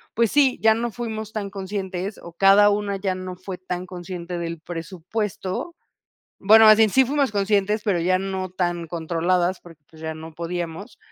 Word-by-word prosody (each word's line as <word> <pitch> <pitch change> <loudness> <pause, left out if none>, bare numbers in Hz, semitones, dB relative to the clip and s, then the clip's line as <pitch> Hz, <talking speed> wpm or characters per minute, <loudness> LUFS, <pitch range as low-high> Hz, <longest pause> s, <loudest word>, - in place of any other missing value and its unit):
pues 230 -2 +2
sí, 275 -3 +4
ya 220 0 +6
no 235 +1 -2
fuimos 220 -1 -5
tan 205 -2 -3
conscientes 195 0 -5
o 170 - -11
cada 195 +3 +6
una 205 -1 -1
ya 190 -1 -1
no 185 0 -6
fue 185 0 -7
tan 180 0 -5
consciente 175 -1 -6
del 170 -1 -4
presupuesto. 185 - -5 0.6
Bueno, 220 +2 +7
así 220 +1 +8
en 210 - +1
sí 265 +4 +5
fuimos 275 -2 0
conscientes, 205 +1 +1
pero 195 -5 +1
ya 185 +2 +2
no 190 -1 -3
tan 175 -2 -2
controladas 175 +2 0
porque 165 -4 -16
ya 160 0 -6
no 160 +1 -10
podíamos, 175 +5 -5
190 Hz, 175 wpm, -23 LUFS, 175-210 Hz, 0.6 s, así